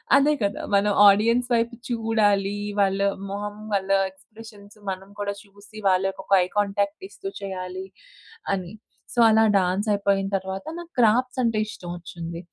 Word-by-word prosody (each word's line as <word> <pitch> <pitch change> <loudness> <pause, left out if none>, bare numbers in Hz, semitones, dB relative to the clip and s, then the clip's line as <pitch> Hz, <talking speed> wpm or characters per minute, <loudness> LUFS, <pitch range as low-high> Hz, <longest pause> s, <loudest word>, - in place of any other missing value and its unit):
అదే 280 +2 +5
గదా! 200 0 -1
మనం 205 +1 +3 0.2
ఆడియన్స్ 230 +5 +4
వైపు 235 +1 +1
చూడాలీ, 210 -4 +1 0.2
వాళ్ళ 195 -1 +2 0.3
మొహం 205 +1 -4 0.2
వాళ్ళ 195 -1 0 0.2
ఎక్స్‌ప్రెషన్స్ 205 +1 -15
మనం 190 +1 -6
కూడా 200 0 -2
చూసి 205 +1 -17
వాళ్ళకి 190 +1 +1
ఒక - - -20
ఐ - - -3
కాంటాక్ట్ 200 - 0
ఇస్తూ 390 - -9
చేయాలి 185 -1 -5 0.7
అని. 185 0 -4 0.4
సో 240 - -2
అలా 220 0 +5 0.2
డాన్స్ 190 +3 0
అయిపోయిన 200 -1 +1
తర్వాత 190 +3 -6
నాకు 345 -1 -9
క్రాఫ్ట్స్ 250 +3 +3
అంటే 230 -2 +1
ఇష్టం 180 -4 -9
వచ్చింది. 170 -1 -7
200 Hz, 145 wpm, -24 LUFS, 195-220 Hz, 0.7 s, అదే